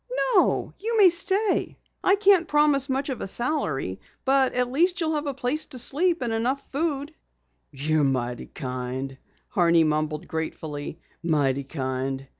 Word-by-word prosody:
"No, 370 - +2
you 450 +3 -1
may 390 -4 +7
stay. 395 +4 0 0.3
I 385 - +5
can't 395 -4 +4
promise 295 -2 +3
much 270 +2 -1
of 260 - -4
a - - -3
salary, 160 - -1 0.3
but 265 -1 +3
at 250 0 0
least 350 +7 +2
you'll 320 -2 0
have 300 -1 -2
a 280 - -1
place 270 +4 -2
to 255 - -7
sleep 330 +6 0
and 235 -2 -1
enough 250 +5 -1
food." 290 0 -2 0.6
"You're 150 +2 0
mighty 125 -3 -1
kind," 130 +1 -5 0.3
Horney 170 -2 +4
mumbled 155 0 -1
gratefully. 160 -1 -5 0.2
"Mighty 140 -5 +1
kind." 135 -1 -3
245 Hz, 150 wpm, -25 LUFS, -, 0.6 s, may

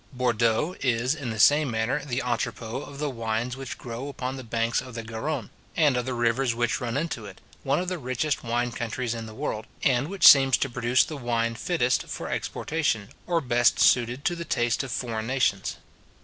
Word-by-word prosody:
Bourdeaux 120 +4 +1
is, 125 0 +1
in 145 -6 -5
the 110 - -4
same 145 +7 +5
manner, 115 +5 -1
the 130 -3 -2
entrepot 120 +1 -3
of 140 - -10
the 150 +1 -1
wines 115 +1 -2
which 135 -1 -7
grow 120 +3 -6
upon 130 -2 -4
the 130 - -7
banks 115 0 0
of 125 -1 -10
the 115 - -4
Garronne, 115 +3 -4 0.3
and 150 -5 +4
of 125 0 -1
the 130 - -2
rivers 120 +1 +1
which 120 +2 0
run 120 +1 -2
into 140 -9 -3
it, - - -12 0.2
one 140 +1 +1
of 180 - -3
the 180 -1 -2
richest 130 +3 -1
wine 120 +1 -1
countries 120 +1 -3
in 115 -1 -6
the 110 - -10
world, 110 0 -4 0.2
and 130 +1 +2
which 195 +2 +5
seems 135 -1 +8
to 140 - -1
produce 125 +1 +3
the 155 - -6
wine 115 -2 0
fittest 125 0 0
for - - -5
exportation, 145 -10 -1 0.2
or 170 -2 +1
best 120 -2 +3
suited 125 +2 +3
to 175 - +1
the 170 - -5
taste 120 -7 0
of 135 -2 -6
foreign 115 -3 -3
nations. 130 -7 0
125 Hz, 205 wpm, -26 LUFS, 115-135 Hz, 0.3 s, seems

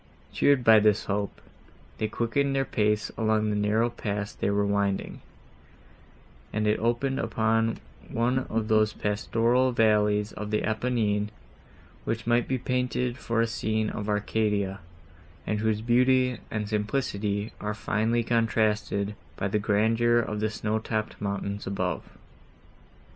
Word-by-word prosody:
Cheered 140 -3 +3
by 110 -2 +7
this 105 0 +3
hope, 100 0 -2 0.6
they 110 - 0
quickened 135 +5 0
their 135 0 +1
pace 105 -1 0
along 110 -1 +2
the - - 0
narrow 105 +3 +1
pass 105 -3 -4
they - - -1
were 100 0 +1
winding, 100 -1 -1 1.3
and 105 0 -1
it 105 0 +2
opened 120 +4 0
upon 115 0 +1 0.3
one 120 +3 +1
of 110 -1 -1
those 110 -1 +3
pastoral 115 +5 +1
valleys 105 -2 +2
of 105 0 -6
the 105 0 0
Apennines, 110 -2 0 0.7
which 115 0 -3
might 120 0 +2
be 130 - 0
painted 125 0 -1
for 115 -2 -1
a - - +3
scene 110 -2 -1
of 105 -1 -4
Arcadia, 105 -2 0 0.7
and 105 - -1
whose 110 -1 0
beauty 125 +1 +3
and 105 -1 -3
simplicity 105 -1 -1
are 105 +1 -2
finely 110 +2 0
contrasted 110 -3 +1 0.2
by 95 - -1
the 105 +2 0
grandeur 115 +3 +2
of 110 -2 -1
the 110 +1 0
snowtopped 110 0 -3
mountains 100 0 -3
above. 90 -3 -3
110 Hz, 135 wpm, -27 LUFS, 105-115 Hz, 1.3 s, by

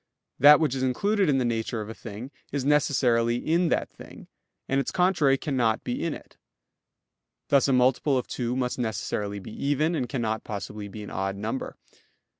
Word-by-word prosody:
That 145 +3 +8
which 155 -5 +1
is 135 - -3
included 195 +9 +1
in 135 - +3
the 130 - +1
nature 115 0 -2
of 105 - -5
a 110 - -6
thing 115 +4 -9 0.2
is 140 -2 -2
necessarily 125 -5 +2
in 165 +7 +1
that - - 0
thing, - - -13 0.4
and 135 - +1
its 135 - -1
contrary 175 -7 +3
cannot 125 -7 0
be 120 - -3
in 165 - -1
it; - - -15 1.1
thus 140 -1 +4
a 135 - +2
multiple 130 +2 +3
of 125 - -2
two 120 -1 -3
must 125 0 -2
necessarily 105 -2 -2
be 100 +2 -9
even, 145 +7 0
and 130 -7 -2
cannot 110 -5 -2
possibly 105 0 -6
be 105 +1 -8
an 105 - -9
odd 95 0 -2
number. 110 +6 -4
125 Hz, 185 wpm, -26 LUFS, 110-145 Hz, 1.1 s, That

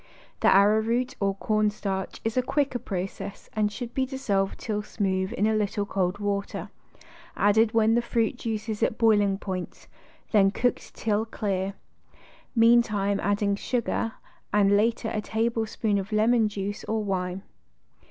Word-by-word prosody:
The - - +2
ar 200 +1 +7
rowroot 245 +3 0
or 195 -1 0
cornstarch 205 -2 -1
is 225 - -1
a 255 - +3
quicker 275 0 0
process 195 -2 -6
and 210 -1 +1
should 240 +2 -6
be 265 -1 0
dissolved 205 -8 -1
till 210 -1 -2
smooth 190 -2 -1
in 210 - +1
a 220 - +2
little 210 -1 0
cold 190 -1 -1
water, 200 -1 -3 0.7
added 220 +3 +3
when 225 0 +4
the 240 - +3
fruit 235 -1 0
juice 225 -3 -4
is 215 -2 -3
at 220 - +1
boiling 205 -4 +3
point, 185 -3 -6 0.5
then 200 -3 +5
cooked 245 +4 -2
till 215 -1 0
clear; 200 -3 -2 0.8
mean 230 +1 +6
time 205 -3 -1
adding 205 0 +1
sugar, 230 0 -1 0.4
and 205 -1 +4
later 225 +2 +1
a 215 - -1
tablespoon 220 -1 -1
of 195 +3 -6
lemon 220 +1 +3
juice 205 0 -4
or 220 0 -1
wine. 185 -1 -2
210 Hz, 150 wpm, -26 LUFS, 200-225 Hz, 0.8 s, ar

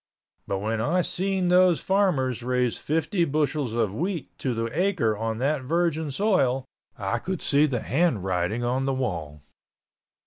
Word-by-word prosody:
But 100 - -1
when 110 +3 -2
I 175 +10 +1
seen 190 0 -1
those 180 -3 +5
farmers 160 - +1
raise 125 -1 0
fifty 165 +4 0
bushels 150 -5 0
of 115 -4 0
wheat 170 - -3
to 125 -3 -1
the 115 0 -1
acre 175 - +1
on 110 +1 -2
that 140 +3 0
virgin 160 +2 0
soil 135 - +1 0.3
I 100 +2 -1
could 185 +6 -4
see 145 +2 +4
the 125 -5 -2
handwriting 105 - 0
on 130 +2 0
the 135 -1 0
wall. 80 - -4
135 Hz, 150 wpm, -25 LUFS, 115-170 Hz, 0.3 s, those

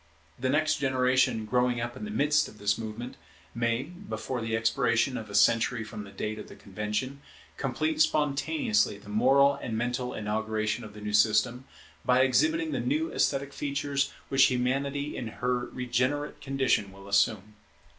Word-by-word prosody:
The 130 +1 0
next 155 +3 +2
generation, 130 -4 +2
growing 125 +1 +1
up 120 +1 -4
in 215 - -6
the - - -6
midst 150 -6 +2
of 110 - -14
this 100 0 +1
movement, 115 +2 -7 0.4
may, 115 +1 0
before 175 - -6
the 115 0 -1
expiration 120 +2 +1
of 110 -3 -6
a 100 - -6
century 115 +3 +3
from 105 -1 -8
the - - -11
date 105 +2 -4
of - - -8
the - - -12
Convention, 105 +7 -4 0.3
complete 315 -1 -1
spontaneously 215 - +1
the 105 +1 -14
moral 135 +6 +4
and 115 -5 -4
mental 125 +2 -2
inauguration 110 +1 -2
of 105 -1 -10
the 105 - -10
new 105 0 -4
system, 110 +4 +3 0.4
by 125 0 +4
exhibiting 315 - +2
the - - -1
new 310 +5 -1
esthetic 140 0 0
features 140 -1 -1 0.2
which 135 -1 +6
Humanity 140 +3 -1
in 120 - -4
her 125 +2 -2
regenerate 130 +4 -2
condition 130 -7 0
will 100 0 -13
assume. 100 +1 +1
125 Hz, 165 wpm, -28 LUFS, 110-140 Hz, 0.4 s, which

